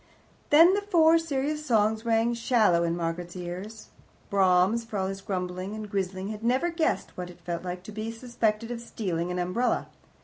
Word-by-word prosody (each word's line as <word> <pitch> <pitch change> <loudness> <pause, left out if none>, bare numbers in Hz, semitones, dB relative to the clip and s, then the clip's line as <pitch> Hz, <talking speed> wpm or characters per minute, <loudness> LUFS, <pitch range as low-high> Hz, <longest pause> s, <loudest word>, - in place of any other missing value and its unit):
Then 330 +5 +7
the 405 - +1
Four 330 -5 +4
Serious 300 -1 -2
Songs 220 -3 +1
rang 230 +1 +2
shallow 230 -7 +3
in 170 0 0
Margaret's 170 +1 -4
ears. 185 +5 -7 0.4
Brahms, 190 +3 +3
for 225 -2 -6
all 190 - 0
his 195 0 -4
grumbling 185 0 -4
and 215 -1 -6
grizzling, 190 0 -2
had 215 0 -6
never 260 +9 +1
guessed 330 -1 -1
what 180 -1 -5
it 175 - -13
felt 170 0 -4
like 180 0 -5
to 215 - -9
be 215 +2 -4
suspected 230 -1 -2
of 235 -1 -5
stealing 180 -7 -3
an 180 - -3
umbrella. 185 +8 0
215 Hz, 180 wpm, -27 LUFS, 180-235 Hz, 0.4 s, Then